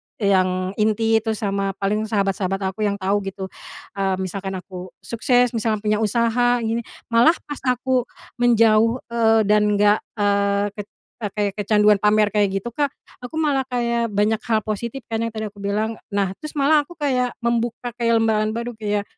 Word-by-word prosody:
yang 185 -2 +1
inti 220 +1 +2
itu, 220 0 -2
sama 195 -2 -2
paling 210 +2 -1
sahabat-sahabat 195 -2 -1
aku 210 +2 -1
yang 200 - -1
tahu 200 +1 0
gitu, 195 -1 -6 0.5
eee, 190 -1 +1
misalkan 190 +1 -4
aku 185 0 -8 0.2
sukses, 245 +1 +2
misalnya 220 -2 -1
punya 210 0 +1
usaha 235 +2 +2
gini. 225 +1 0 0.3
Malah 240 +9 +5
pas 290 -1 -7
aku 250 0 +1 0.3
menjauh, 230 -1 +4 0.2
eee, 225 -1 +3
dan 210 0 +3
enggak, 205 +1 +4 0.2
eee, 200 0 +1
ket 205 0 -8 0.3
eee, 210 -4 -4
kaya 205 -1 +1
kecanduan 210 0 +3
pamer 210 0 +3
kayak 210 -2 +3 0.2
gitu, 240 - -5
Kak. 285 +3 -1 0.3
Aku 315 - -11
malah 285 -4 +1
kayak 235 -1 0
banyak 210 +1 +1
hal 220 -3 0
positif 235 +5 -4
kan, 225 - -1
yang 230 0 -3
tadi 215 -1 -4
aku 200 - -17
bilang. 215 +3 -2
E 205 - -10
nah, 195 -2 +1
terus 305 0 -8
malah 295 +1 +4
aku 345 - -12
kayak, 255 -5 0
membuka 235 +1 -1
kayak 230 -1 +2
lembaran 215 0 +1
baru, 235 +1 -3
kayak, 205 -1 -1
215 Hz, 175 wpm, -22 LUFS, 200-235 Hz, 0.5 s, Malah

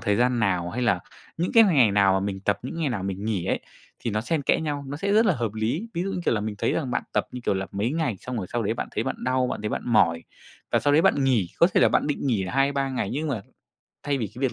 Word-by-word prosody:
thời 105 0 +1
gian 125 0 +2
nào, 90 -5 0
hay 125 +5 -3
là 100 -7 +2 0.4
những 175 +2 -1
cái 230 -1 +8
ngày 140 - +4
nào 100 -1 +4
mà 95 - +2
mình 95 -1 -4
tập, 100 +1 0
những 130 - -6
ngày 155 - +1
nào 115 -7 -3
mình 95 +1 -4
nghỉ 105 -6 -1
ấy, - - -1 0.4
thì 115 - -3
nó 105 - 0
xen 145 +6 -1
kẽ - - +2
nhau, 145 -3 -3
nó 145 - -4
sẽ 200 +5 -1
rất 220 +2 +5
là - - +3
hợp 115 -3 -3
lý. 120 - -2
Ví 170 - -1
dụ, 195 - -2
như - - -3
kiểu - - +2
là, 105 - 0
mình 105 0 -3
thấy - - +1
rằng 135 -6 -2
bạn - - -1
tập, - - +1
như 125 - -6
kiểu - - +1
là, 95 0 -2
mấy 105 +5 -1
ngày 155 -10 -1
xong 125 -1 -5
rồi 95 -5 -3
sau 120 -1 0
đấy - - 0
bạn - - -4
thấy - - -2
bạn - - -2
đau, 130 0 +1
bạn 105 - -4
thấy 105 - -1
bạn - - -3
mỏi 85 -8 +3 0.5
và - - +4
sau 145 - +2
đấy 160 +3 +5
bạn 140 - +3
nghỉ, 120 -9 +2
có 170 - +7
thể - - +5
là - - +6
bạn - - +1
định 145 -1 -2
nghỉ 110 -8 +1
2-3 135 +5 +1
ngày 125 -6 -2
nhưng 155 +3 -2
mà 115 -8 -2 0.6
thay 140 -1 -1
vì 115 - -1
cái 125 - -9
việc 130 -3 +1
125 Hz, 310 wpm, -25 LUFS, 100-145 Hz, 0.6 s, cái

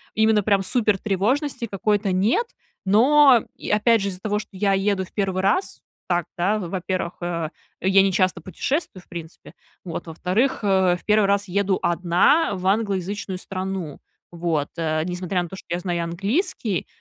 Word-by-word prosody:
именно 220 -1 +4
прям 200 -1 +2
супер 210 0 +2
тревожности 235 - -1
какой-то 205 0 0
нет, 210 - +2 0.4
но, 255 +5 +5
и - - -8
опять 220 +1 +3
же, 200 - -1
из-за 180 -1 -7
того, 210 +1 -1
что 215 - -9
я 195 +1 +1
еду 195 -1 +1
в - - -22
1 190 -2 -1
раз, 205 - 0 0.3
так, 175 -2 +1
да, 200 +5 +2
во-первых, 185 -2 -3
э, 170 -2 -2 0.3
я 195 +1 +5
не 195 0 +2
часто 185 -2 +1
путешествую, 190 - -3
в - - -32
принципе, 165 -1 -10 0.3
вот, 170 -1 -6
во-вторых, 185 +11 0
э, 190 -3 +3
в - - -22
1 210 -1 +3
раз 200 0 +1
еду 195 +1 +1
одна 180 - +3
в 185 0 -6
англоязычную 195 -1 -1
страну, 185 -4 -5 0.3
вот, 165 -4 -1
э. 155 -1 0
Несмотря 180 0 -2
на 175 - -8
то, 190 - -8
что - - -13
я 175 - -1
знаю 175 -1 -2
английский, 205 - -1
195 Hz, 170 wpm, -23 LUFS, 180-210 Hz, 0.4 s, но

